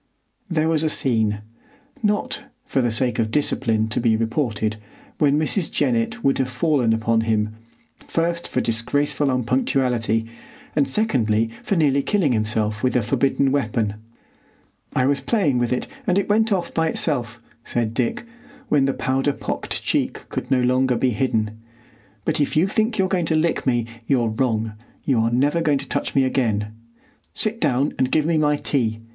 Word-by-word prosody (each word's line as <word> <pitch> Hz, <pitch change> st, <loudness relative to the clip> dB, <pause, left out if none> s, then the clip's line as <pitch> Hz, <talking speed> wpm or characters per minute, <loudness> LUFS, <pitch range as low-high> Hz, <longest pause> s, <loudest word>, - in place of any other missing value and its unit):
There 160 Hz, -2 st, +1 dB
was 160 Hz, -2 st, +2 dB
a 160 Hz, -, +1 dB
scene, 110 Hz, -7 st, +1 dB, 0.6 s
not, 210 Hz, -1 st, -1 dB, 0.2 s
for 135 Hz, -, 0 dB
the 120 Hz, -1 st, +1 dB
sake 120 Hz, +2 st, 0 dB
of 110 Hz, -1 st, +1 dB
discipline, 115 Hz, -5 st, 0 dB
to -, -, -1 dB
be 115 Hz, -2 st, +3 dB
reported, 110 Hz, -2 st, -1 dB, 0.4 s
when 145 Hz, -1 st, +3 dB
Mrs. 155 Hz, +3 st, -1 dB
Jennett 235 Hz, -1 st, 0 dB
would 135 Hz, -, +2 dB
have 130 Hz, -1 st, 0 dB
fallen 130 Hz, -2 st, +1 dB
upon 115 Hz, 0 st, +2 dB
him, 110 Hz, -1 st, 0 dB, 0.5 s
first 170 Hz, +1 st, -1 dB
for -, -, -1 dB
disgraceful 145 Hz, +5 st, +1 dB
unpunctuality, 125 Hz, -3 st, +1 dB, 0.5 s
and 145 Hz, -3 st, +3 dB
secondly 115 Hz, -, +1 dB
for 200 Hz, -, -1 dB
nearly 140 Hz, -4 st, +3 dB
killing 185 Hz, -4 st, +1 dB
himself 105 Hz, -1 st, 0 dB
with 130 Hz, -, +1 dB
a 125 Hz, -, +3 dB
forbidden 135 Hz, +3 st, +1 dB
weapon. 110 Hz, -6 st, 0 dB, 1.0 s
"I 130 Hz, -, +3 dB
was 140 Hz, +1 st, +2 dB
playing 155 Hz, -, +1 dB
with 120 Hz, -1 st, 0 dB
it, 125 Hz, -, 0 dB, 0.2 s
and 180 Hz, -, +3 dB
it 200 Hz, -, +1 dB
went 220 Hz, +2 st, +3 dB
off 185 Hz, -3 st, -1 dB
by 165 Hz, 0 st, +1 dB
itself," 125 Hz, -7 st, -1 dB, 0.2 s
said 115 Hz, -2 st, -1 dB
Dick, 125 Hz, -, -1 dB, 0.4 s
when 140 Hz, -2 st, +3 dB
the 135 Hz, -, 0 dB
powder 135 Hz, +2 st, 0 dB
pocked -, -, -4 dB
cheek -, -, -1 dB
could 125 Hz, -, -4 dB
no 130 Hz, -2 st, +3 dB
longer 125 Hz, 0 st, +2 dB
be 125 Hz, +2 st, +1 dB
hidden, 110 Hz, -2 st, -1 dB, 0.7 s
"but -, -, 0 dB
if 145 Hz, -, 0 dB
you 160 Hz, -, +5 dB
think 220 Hz, +2 st, 0 dB
you're 190 Hz, -1 st, +2 dB
going 180 Hz, -3 st, 0 dB
to 160 Hz, -, +2 dB
lick 155 Hz, -2 st, 0 dB
me 120 Hz, -2 st, +2 dB, 0.2 s
you're 120 Hz, -4 st, +2 dB
wrong. 110 Hz, -2 st, -1 dB, 0.3 s
You 130 Hz, -5 st, +2 dB
are 115 Hz, +1 st, +2 dB
never 145 Hz, +7 st, +2 dB
going 150 Hz, -3 st, +2 dB
to 135 Hz, 0 st, -6 dB
touch -, -, -2 dB
me 135 Hz, -, +4 dB
again. 110 Hz, -5 st, 0 dB, 0.6 s
Sit 225 Hz, +1 st, -1 dB
down 140 Hz, -1 st, +1 dB
and 130 Hz, 0 st, +1 dB
give 155 Hz, -1 st, +2 dB
me 165 Hz, -1 st, +2 dB
my 150 Hz, -1 st, +3 dB
tea. 115 Hz, -6 st, -1 dB
130 Hz, 175 wpm, -22 LUFS, 115-155 Hz, 1.0 s, you